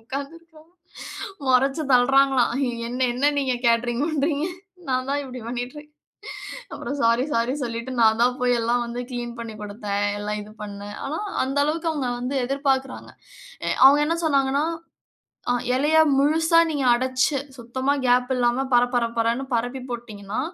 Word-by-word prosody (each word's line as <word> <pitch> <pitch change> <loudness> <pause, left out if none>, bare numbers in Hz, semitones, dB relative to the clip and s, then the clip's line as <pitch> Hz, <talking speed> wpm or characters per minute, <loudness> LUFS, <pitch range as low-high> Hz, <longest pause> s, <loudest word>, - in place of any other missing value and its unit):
உட்கார்ந்து 275 +6 -6 1.1
முறைச்சு 270 +4 +3
தள்ளுறாங்களாம். 270 0 +4 0.4
என்ன? 250 +1 -5
என்ன 285 +4 +2
நீங்க 265 -2 0
கேட்டரிங் 235 +3 +2
பண்றீங்க? 300 -1 0 0.5
நான் 255 0 0
தான் 285 0 0
இப்டி 255 -1 -8
பண்ணிறேன். 250 +5 -6 0.8
அப்புறம் 285 - -5
சாரி 230 +2 +3
சாரின்னு 255 +3 0
சொல்லிட்டு 235 +2 -5
நான் 220 -1 +5
தான் 250 +1 +3
போய் 250 0 +2
எல்லாம் 240 +1 +1
வந்து 235 +1 -5
கிளீன் 240 -1 -4
பண்ணி 230 -2 -6
குடுத்தேன் 205 -1 -3 0.2
எல்லாம் 210 0 -3
இது 210 - -12
பண்ணினேன். 205 0 -7
ஆனா, 305 +4 -3 0.2
அந்த 270 +2 -2
அளவுக்கு 325 +2 -1
அவங்க 285 -5 -2
வந்து 255 +3 -3
எதிர்பார்க்குறாங்க. 270 0 -1 0.5
அ - - -1 0.2
அவங்க 280 +2 +8
என்ன 325 +3 0
சொன்னாங்கன்னா, 275 -1 +2 0.9
அ - - +4 0.2
இலையா 310 +4 +4 0.2
முழுசா 320 +4 +3
நீங்க 290 -3 -1
அடைச்சு, 260 +3 +1 0.2
சுத்தமா 260 +3 -1
கேப் 250 +1 +3
இல்லாம 245 +2 +1
பர 240 0 +6
பர 240 -1 +2
பரன்னு 230 +4 0
பரப்பி 245 +3 -2
போட்டுட்டீங்கன்னா, 215 -3 -5
255 Hz, 145 wpm, -23 LUFS, 235-280 Hz, 1.1 s, அவங்க